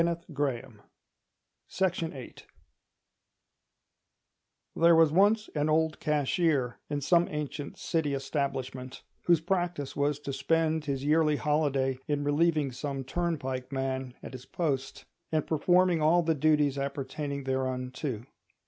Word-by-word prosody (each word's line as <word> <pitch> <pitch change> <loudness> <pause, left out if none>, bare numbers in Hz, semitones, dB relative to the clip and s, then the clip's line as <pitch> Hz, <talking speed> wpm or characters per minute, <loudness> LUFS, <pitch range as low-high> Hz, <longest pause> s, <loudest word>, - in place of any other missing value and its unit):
The 170 0 +1
Eternal 130 -7 -3 1.0
Whither 165 -8 -1 2.4
There 170 0 +6
was 160 -2 +5
once 205 +5 +4
an 150 0 0
old 160 0 +1
cashier 150 -3 +1
in 145 -1 -2
some 170 +4 +3
ancient 150 -1 -5
City 155 -4 -1
establishment, 130 -2 -3 0.2
whose 170 -3 +4
practice 175 -5 -2
was 145 0 +1
to 140 - -4
spend 160 +3 +1
his 140 -1 -2
yearly 155 0 +3
holiday 140 -3 0
in 145 -1 0
relieving 150 -1 +2
some 135 +1 -4
turnpike 135 -4 -3
man 130 -1 -3
at - - -8
his 130 0 -9
post, 135 -6 -2 0.3
and 155 -2 +1
performing 175 +2 +3
all 170 +3 +4
the 165 0 +2
duties 150 -2 +2
appertaining 140 +1 -4
thereunto. 130 -2 -3
145 Hz, 120 wpm, -29 LUFS, 135-160 Hz, 2.4 s, There